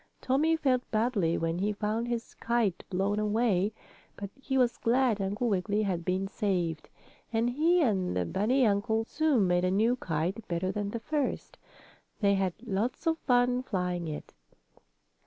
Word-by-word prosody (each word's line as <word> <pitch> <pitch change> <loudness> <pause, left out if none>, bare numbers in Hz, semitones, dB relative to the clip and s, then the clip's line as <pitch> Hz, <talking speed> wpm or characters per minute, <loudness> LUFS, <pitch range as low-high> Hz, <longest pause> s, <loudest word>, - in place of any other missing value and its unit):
Tommie 300 +5 +2
felt 260 -5 0
badly 215 -7 +1
when 165 +1 -1
he 205 +2 0
found 215 +3 -2
his 235 -1 -4
kite 230 -6 0
blown 195 +2 0
away. 210 -2 +1 0.4
But 200 -1 -7
he 265 0 -1
was 245 -2 +2
glad 240 -3 +2
Uncle 205 +5 -1
Wiggily 205 +1 0
had 180 -4 -1
been 185 +2 -1
saved, 180 -6 -2 0.4
and 230 +1 +1
he 330 +6 +3
and 190 - 0
the 90 - 0
bunny 240 - +2
uncle 220 +2 +1
soon 290 -7 +2
made 180 0 +2
a 185 - +2
new 220 +6 +2
kite, 185 +1 -3
better 180 +2 -1
than 205 0 -3
the 230 - -4
first. 290 +3 -3 0.6
They 200 -2 +3
had 190 -2 0
lots 225 +3 -2
of 325 0 +1
fun 245 -1 +2
flying 180 -7 -2
it. 150 -1 -7
210 Hz, 160 wpm, -29 LUFS, 190-245 Hz, 0.6 s, he